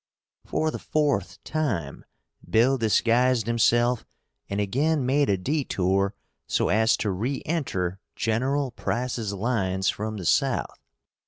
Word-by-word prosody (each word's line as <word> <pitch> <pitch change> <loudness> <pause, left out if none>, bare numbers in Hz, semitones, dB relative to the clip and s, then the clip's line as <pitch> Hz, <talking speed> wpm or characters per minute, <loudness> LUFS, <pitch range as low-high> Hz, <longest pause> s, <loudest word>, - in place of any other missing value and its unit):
For 155 0 0
the - - -5
fourth 145 -11 0
time 110 - -2 0.4
Bill 120 +5 +4
disguised 115 +1 +3
himself 120 +1 +2 0.5
and 100 - -2
again 135 +8 +1
made 140 +1 +2
a 100 - +3
detour 100 - 0 0.3
so - - +1
as 110 +4 +3
to 105 - -1
re 120 +9 -2
enter 95 - -2 0.2
General 130 +5 0
Price's 120 -3 -2
lines 95 -3 0
from 110 +1 -3
the 95 - -6
South. - - +1
115 Hz, 120 wpm, -25 LUFS, 100-135 Hz, 0.5 s, Bill